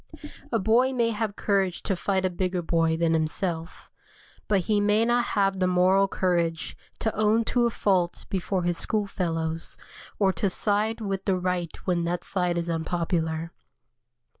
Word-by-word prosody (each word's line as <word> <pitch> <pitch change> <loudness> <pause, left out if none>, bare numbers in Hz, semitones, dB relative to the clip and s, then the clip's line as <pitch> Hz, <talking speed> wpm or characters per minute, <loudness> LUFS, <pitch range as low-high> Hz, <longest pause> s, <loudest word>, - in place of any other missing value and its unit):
A 230 - +2
boy 230 +5 +3
may 235 -2 +1
have 210 -1 -2
courage 195 -3 0
to 195 - 0
fight 190 +1 0
a 185 - 0
bigger 180 0 -2
boy 165 -1 +1
than 165 0 +2
himself, 165 +1 -2 0.6
but 200 -3 +2
he 205 +3 +1
may 210 +2 +3
not 240 +1 +2
have 195 -1 +2
the 185 - +2
moral 185 +2 +4
courage 170 -4 -1 0.2
to 220 - -2
own 215 +2 +3
to 240 +1 +2
a - - +1
fault 185 -5 0
before 190 -1 -1
his 175 -1 0
school 215 -2 0
fellows, 165 -4 -3 0.4
or 195 -2 +3
to 190 +4 0
side 210 +4 0
with 195 -2 -3
the 190 -2 +2
right 180 -2 -2
when 175 -2 +1
that 175 +1 -2
side 180 -2 -1
is 170 0 -2
unpopular. 165 -1 -1
185 Hz, 165 wpm, -26 LUFS, 170-205 Hz, 0.6 s, moral